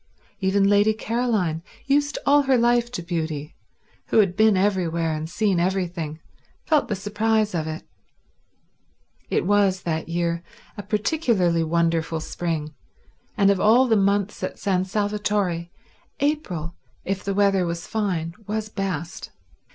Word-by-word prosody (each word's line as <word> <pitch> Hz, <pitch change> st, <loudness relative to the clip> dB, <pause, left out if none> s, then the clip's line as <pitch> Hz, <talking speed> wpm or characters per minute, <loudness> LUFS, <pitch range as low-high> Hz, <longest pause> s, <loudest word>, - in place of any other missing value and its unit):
Even 195 Hz, 0 st, +2 dB
Lady 205 Hz, +2 st, +4 dB
Caroline, 220 Hz, -8 st, -1 dB, 0.2 s
used 285 Hz, +1 st, +1 dB
all 290 Hz, +1 st, +5 dB
her 270 Hz, -2 st, +3 dB
life 240 Hz, 0 st, +2 dB
to 180 Hz, -, -5 dB
beauty, 160 Hz, -3 st, -4 dB, 0.5 s
who -, -, +1 dB
had 195 Hz, -5 st, +4 dB
been 215 Hz, -1 st, +4 dB
everywhere 170 Hz, -5 st, +1 dB
and 155 Hz, +1 st, -4 dB
seen 195 Hz, -1 st, +1 dB
everything, 175 Hz, -4 st, -2 dB, 0.5 s
felt 305 Hz, -2 st, +2 dB
the 210 Hz, -, -1 dB
surprise 210 Hz, +2 st, 0 dB
of 160 Hz, -2 st, -2 dB
it. 155 Hz, 0 st, -5 dB, 1.5 s
It -, -, 0 dB
was, 195 Hz, -2 st, +2 dB
that 160 Hz, -1 st, -2 dB
year, 170 Hz, 0 st, -1 dB, 0.3 s
a -, -, -5 dB
particularly 205 Hz, -, +1 dB
wonderful 165 Hz, 0 st, 0 dB
spring, 160 Hz, -2 st, -3 dB, 0.6 s
and 200 Hz, 0 st, +5 dB
of 195 Hz, -, 0 dB
all 235 Hz, +6 st, +5 dB
the 225 Hz, -, +3 dB
months 200 Hz, 0 st, +1 dB
at -, -, -4 dB
San 190 Hz, -2 st, 0 dB
Salvatore 205 Hz, -3 st, -1 dB, 0.5 s
April, 195 Hz, -, -1 dB, 0.3 s
if 195 Hz, 0 st, -2 dB
the 195 Hz, -1 st, -2 dB
weather 195 Hz, -3 st, +3 dB
was 170 Hz, 0 st, -4 dB
fine, 180 Hz, -7 st, -2 dB
was 215 Hz, +1 st, -3 dB
best. 190 Hz, -5 st, -4 dB
195 Hz, 135 wpm, -23 LUFS, 170-215 Hz, 1.5 s, all